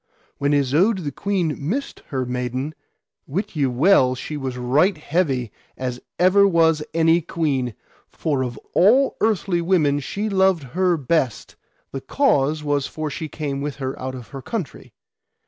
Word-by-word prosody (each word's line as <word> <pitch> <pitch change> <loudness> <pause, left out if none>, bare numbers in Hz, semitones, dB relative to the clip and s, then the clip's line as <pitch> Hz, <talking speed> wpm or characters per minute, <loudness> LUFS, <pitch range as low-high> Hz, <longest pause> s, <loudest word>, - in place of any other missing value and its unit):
When 140 +1 +1
Isoud 155 - +2
the 145 - -3
queen 180 -2 -1
missed 220 - -3
her 130 -2 -2
maiden, 125 +4 -3 0.5
wit 180 +7 -3
ye 140 -3 +2
well 130 0 +4
she 150 +4 -6
was 135 -3 -4
right 145 +10 +2
heavy 145 - -1 0.3
as 125 -1 -3 0.2
ever 185 +3 +5
was 165 -4 +3
any 165 +1 +3
queen, 140 - -1 0.3
for 145 -4 -2
of 120 -3 -5 0.2
all 250 +9 +4
earthly 195 -5 +1
women 160 -5 +2
she 200 +10 -3
loved 190 -5 +2
her 180 -1 +2
best: 135 -4 -1 0.4
the 135 - -5
cause 155 - +1
was 145 -2 0
for 155 -1 -4
she 160 - -4
came 140 -3 -4
with 145 -1 -3
her 135 -2 -3
out 130 0 -4
of 125 -3 -10
her 135 -2 -8
country. 185 - -6
150 Hz, 155 wpm, -22 LUFS, 130-180 Hz, 0.5 s, ever